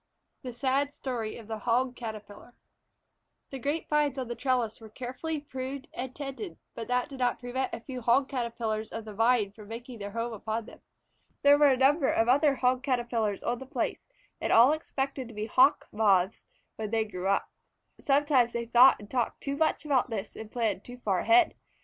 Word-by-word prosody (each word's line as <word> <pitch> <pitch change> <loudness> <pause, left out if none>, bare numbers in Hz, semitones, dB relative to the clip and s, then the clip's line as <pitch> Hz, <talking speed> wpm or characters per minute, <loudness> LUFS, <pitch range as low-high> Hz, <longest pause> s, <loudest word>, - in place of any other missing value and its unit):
THE 255 - -6
SAD 275 +3 0
STORY 235 -5 -4
OF 225 -3 -11
THE 220 -1 -4
HOG 245 +3 +1
CATERPILLAR 215 0 -9 1.0
THE 270 - -5
grape 290 +6 -2
vines 295 -2 +1
on 255 -2 -3
the - - -2
trellis 235 -3 -1
were 220 - -11
carefully 260 +7 -4
pruned 270 +1 -6
and 255 0 -5
tended, 285 +6 -6 0.2
but 230 - -6
that 250 0 +1
did 270 -2 -9
not 245 -1 +1
prevent 255 +1 -3
a - - -5
few 255 +1 -7
Hog 245 +4 +3
Caterpillars 230 -4 -3
of 225 -1 -6
the 215 - -8
Vine 225 -1 +2
from 210 0 -13
making 235 +1 -8
their 200 0 -5
home 230 +2 -3
upon 220 +1 -3
them. - - -14 0.6
There 285 0 +8
were 290 0 +5
a 265 -2 +4
number 275 +3 +4
of 225 - +2
other 280 +3 +4
Hog 255 0 +1
Caterpillars 235 -5 -1
on 240 0 -1
the 265 - -9
place, - - -2 0.4
and - - -1
all 240 +5 +7
expected 275 -4 -3
to 230 - -12
be 210 +1 -3
Hawk 260 +6 +4
Moths 200 -2 +2 0.3
when 215 -1 -4
they 220 0 +1
grew 185 -3 -5
up. 195 - +1 0.5
Sometimes 275 -4 +3
they 235 0 -2
thought 245 +3 +7
and 205 - -11
talked 240 0 -2
too 280 0 -3
much 315 +1 0
about 270 -3 +2
this, 215 -3 -5
and 220 -1 -9
planned 220 -5 -1
too 245 0 -10
far 200 -7 0
ahead. 350 0 +4
245 Hz, 200 wpm, -29 LUFS, 225-270 Hz, 1.0 s, There